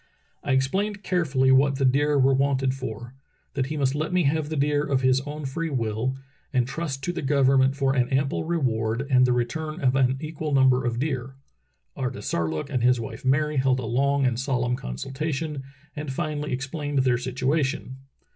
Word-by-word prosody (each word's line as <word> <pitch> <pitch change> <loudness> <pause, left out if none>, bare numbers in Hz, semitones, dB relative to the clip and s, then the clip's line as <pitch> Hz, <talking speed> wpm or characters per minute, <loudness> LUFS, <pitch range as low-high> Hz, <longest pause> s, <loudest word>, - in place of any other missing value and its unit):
*T - - -2
explained 195 +10 0
carefully 140 -9 +2
what 135 +1 +4
the 135 0 0
deer 145 +3 +3
were 135 0 +4
wanted 135 -1 +1
for; 120 -2 -7 0.4
that 135 -1 -1
he 155 +2 -4
must 135 -2 +1
let 155 +4 -2
me 180 -1 +2
have 150 +1 0
the 160 - -3
deer 145 0 +1
of 140 -3 0
his 130 0 +3
own 150 0 -5
free 165 +5 -3
will, 120 0 -1 0.3
and 125 -3 +1
trust 135 -1 -4
to 175 - -1
the - - -4
government 135 -1 +3
for 135 -1 +1
an 125 -2 +1
ample 135 +2 0
reward 125 -7 -1
and 125 -1 +5
the - - +2
return 155 +6 -2
of 130 -1 +2
an 130 -1 +2
equal 155 0 -4
number 130 -2 +4
of 120 -1 -2
deer. 135 -1 -3 0.6
"Artisarlook 85 - -2
and 125 -3 0
his 125 0 +3
wife 115 - -7
Mary 145 +3 +1
held 130 0 +2
a 125 - -4
long 140 +4 +1
and 125 -2 0
solemn 125 -2 0
consultation 135 - -4 0.3
and 150 -1 -4
finally 150 +2 -3
explained 135 +1 -1
their 125 -2 +2
situa 130 +5 0
tion. 130 -1 -4
135 Hz, 185 wpm, -25 LUFS, 130-145 Hz, 0.6 s, and